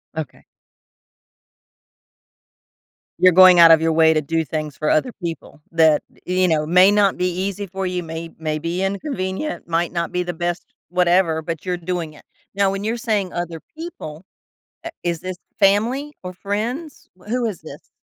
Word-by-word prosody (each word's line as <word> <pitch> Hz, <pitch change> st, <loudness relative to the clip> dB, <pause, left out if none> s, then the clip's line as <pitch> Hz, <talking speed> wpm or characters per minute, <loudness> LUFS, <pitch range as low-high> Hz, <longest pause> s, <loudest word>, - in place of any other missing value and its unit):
Okay. 160 Hz, -2 st, -6 dB, 2.8 s
You're 185 Hz, 0 st, +6 dB
going 185 Hz, 0 st, +8 dB
out 165 Hz, -1 st, +9 dB
of 160 Hz, -1 st, +6 dB
your 165 Hz, 0 st, +1 dB
way 160 Hz, 0 st, +5 dB
to 155 Hz, -, +1 dB
do 160 Hz, +2 st, -1 dB
things 155 Hz, 0 st, -4 dB
for 155 Hz, -, -1 dB
other 245 Hz, +11 st, +2 dB
people 170 Hz, -8 st, -7 dB
that, 160 Hz, -2 st, +4 dB, 0.2 s
you 185 Hz, 0 st, +2 dB
know, 155 Hz, -2 st, +1 dB
may 180 Hz, +4 st, +6 dB
not 205 Hz, -2 st, +3 dB
be 180 Hz, -, 0 dB
easy 190 Hz, +3 st, -3 dB
for 190 Hz, 0 st, -4 dB
you, 180 Hz, -1 st, -3 dB
may 165 Hz, 0 st, -6 dB
may 155 Hz, -1 st, -3 dB
be 170 Hz, +4 st, -2 dB
inconvenient, 200 Hz, +4 st, -3 dB
might 170 Hz, 0 st, 0 dB
not 170 Hz, -1 st, -2 dB
be 180 Hz, -, -1 dB
the 175 Hz, 0 st, -4 dB
best 175 Hz, +1 st, -3 dB, 0.2 s
whatever, 175 Hz, -2 st, +2 dB
but 165 Hz, +1 st, -6 dB
you're 180 Hz, -1 st, -1 dB
doing 175 Hz, -2 st, -4 dB
it. 150 Hz, -, -17 dB, 0.3 s
Now, 200 Hz, -1 st, +2 dB
when 195 Hz, +1 st, -4 dB
you're 225 Hz, +3 st, -1 dB
saying 210 Hz, -5 st, -1 dB
"other 170 Hz, -1 st, -4 dB, 0.2 s
people," 310 Hz, -, -8 dB, 0.6 s
i 335 Hz, -, -5 dB
is 170 Hz, -2 st, -2 dB
this 185 Hz, 0 st, -5 dB, 0.2 s
family 230 Hz, +9 st, +2 dB
or 180 Hz, -1 st, -6 dB
friends? 225 Hz, -, -5 dB
W 195 Hz, +4 st, -13 dB
who 245 Hz, +1 st, 0 dB
is 205 Hz, -7 st, -4 dB
this? -, -, -12 dB
180 Hz, 175 wpm, -21 LUFS, 165-195 Hz, 2.8 s, out